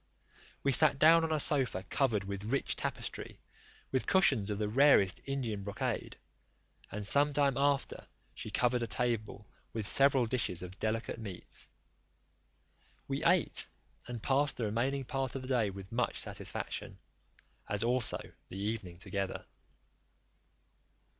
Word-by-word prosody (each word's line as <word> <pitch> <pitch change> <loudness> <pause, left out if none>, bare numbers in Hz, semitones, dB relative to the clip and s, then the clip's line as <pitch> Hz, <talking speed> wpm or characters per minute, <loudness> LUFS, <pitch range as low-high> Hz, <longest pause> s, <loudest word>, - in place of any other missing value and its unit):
We 140 - +3
sat 140 +1 +7
down 165 +3 +6
on 160 - -1
a 155 - +1
sofa 130 - +2
covered 115 -7 0
with 100 +1 -5
rich 135 +5 -1
tapestry, - - -5 0.5
with 130 - -1
cushions 115 - +4
of 105 - -2
the 105 0 -1
rarest 110 -5 +4
Indian 125 -7 -3
brocade; 100 0 -3 0.7
and 105 0 -5
some 145 +6 +3
time 140 -2 +2
after 140 +1 0 0.3
she - - -6
covered 125 0 +1
a 115 - -1
table 110 -4 -2 0.3
with 110 -2 -3
several 135 +2 +4
dishes 110 -7 -1
of 90 +1 -9
delicate 115 +1 -2
meats. 100 -5 -5 1.4
We - - -2
ate, - - +3 0.4
and 120 -3 -6
passed 140 +2 +2
the 120 - -2
remaining 125 +6 -1
part 135 0 -3
of 135 - -4
the - - -7
day 120 -6 +1
with 95 0 -9
much 120 +1 -1
satisfaction, - - -4 0.7
as 105 +2 +1
also 120 -2 +1 0.3
the 95 - -8
evening, 100 -4 -4
together. 95 +1 -4
120 Hz, 140 wpm, -32 LUFS, 105-135 Hz, 1.4 s, sat